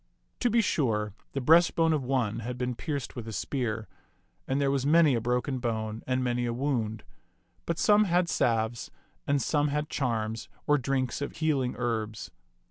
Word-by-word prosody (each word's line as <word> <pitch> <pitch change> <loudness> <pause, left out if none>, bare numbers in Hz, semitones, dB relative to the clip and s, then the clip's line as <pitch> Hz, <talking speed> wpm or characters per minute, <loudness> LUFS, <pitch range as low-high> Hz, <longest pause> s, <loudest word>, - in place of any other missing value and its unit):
To 245 - +2
be 230 +1 +4
sure, 110 - 0 0.2
the 135 - -2
breastbone 165 +2 +5
of 150 -3 0
one 125 -5 0
had 120 +2 -5
been 125 0 -1
pierced 140 +1 -4
with 120 -3 -6
a - - -5
spear, 110 -2 -2 0.6
and 135 +1 0
there 140 -1 +2
was 135 -2 0
many 155 0 +5
a 115 - 0
broken 125 +3 -1
bone 110 -2 -3
and 130 0 +1
many 120 -1 0
a 120 - -1
wound; 115 -5 -1 0.6
but 170 - -1
some 210 +2 +5
had 180 -1 +2
salves, 115 -4 0 0.4
and 140 0 +2
some 145 +2 +1
had 150 +1 -2
charms, 115 -4 -2 0.2
or 150 0 +3
drinks 130 0 -1
of 145 - -4
healing 145 -6 0
herbs. 110 -3 -3
130 Hz, 175 wpm, -28 LUFS, 115-145 Hz, 0.6 s, breastbone